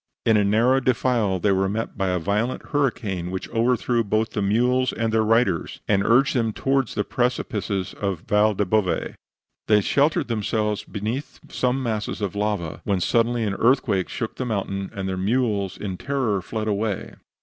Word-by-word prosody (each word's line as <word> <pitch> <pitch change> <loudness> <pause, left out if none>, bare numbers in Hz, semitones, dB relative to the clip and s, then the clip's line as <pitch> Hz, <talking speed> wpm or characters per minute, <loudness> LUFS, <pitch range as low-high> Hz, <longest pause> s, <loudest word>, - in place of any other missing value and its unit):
In 110 - +4
a 105 - +4
narrow 115 +6 +3
defile 120 -6 +1
they 100 +3 +1
were 95 0 +2
met 110 +3 -3
by 95 - -1
a 90 - +1
violent 105 +8 -2
hurricane, 110 - -1
which 95 0 -4
overthrew 120 0 +1
both 110 +2 0
the 105 - -2
mules 125 +5 +2
and 110 0 -2
their 110 - +4
riders, 110 -6 +1
and 100 -2 +2
urged 130 +7 +4
them 115 -3 +1
toward 135 +1 +1
the 105 - -2
precipices 105 -6 -2
of 100 -3 -2
the 80 - -23
Val 105 0 +3
del 105 - +1
Bove. 95 -1 0 0.5
They 105 -1 +5
sheltered 145 +9 +2
themselves 105 -2 -1
beneath 110 +7 -4
some 130 +1 0
masses 110 -3 -2
of 100 -2 -2
lava, 100 -6 -2
when 100 -2 0
suddenly 115 +5 +1
an 105 -2 -1
earthquake 115 -4 +2
shook 115 -3 -4
the - - -2
mountain, 100 -3 -2
and 95 -1 -3
their 95 -1 -2
mules 100 -2 0
in 95 -3 -5
terror 125 -8 -1
fled 110 +4 -4
away. 105 -1 -2
110 Hz, 180 wpm, -23 LUFS, 100-120 Hz, 0.5 s, They